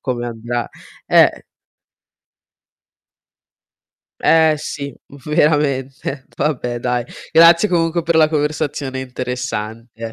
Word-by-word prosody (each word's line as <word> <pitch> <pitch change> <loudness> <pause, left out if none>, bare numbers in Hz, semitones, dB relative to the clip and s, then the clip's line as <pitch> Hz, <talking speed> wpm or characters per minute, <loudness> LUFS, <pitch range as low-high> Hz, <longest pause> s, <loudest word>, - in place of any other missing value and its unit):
come 125 -2 -3
andrà, 120 +1 -4 0.4
Eh - - +4 2.8
Eh, 160 -1 +4
sì 140 -2 -6 0.3
veramente, 140 -3 0
vabbè 125 -5 -1
dai, 125 0 -1 0.3
grazie 170 +4 +6
comunque 170 -1 +1
per 170 0 +1
la 155 -1 +5
conversazione 150 -3 -2
interessante. 115 -3 -5
135 Hz, 85 wpm, -18 LUFS, 120-155 Hz, 2.8 s, grazie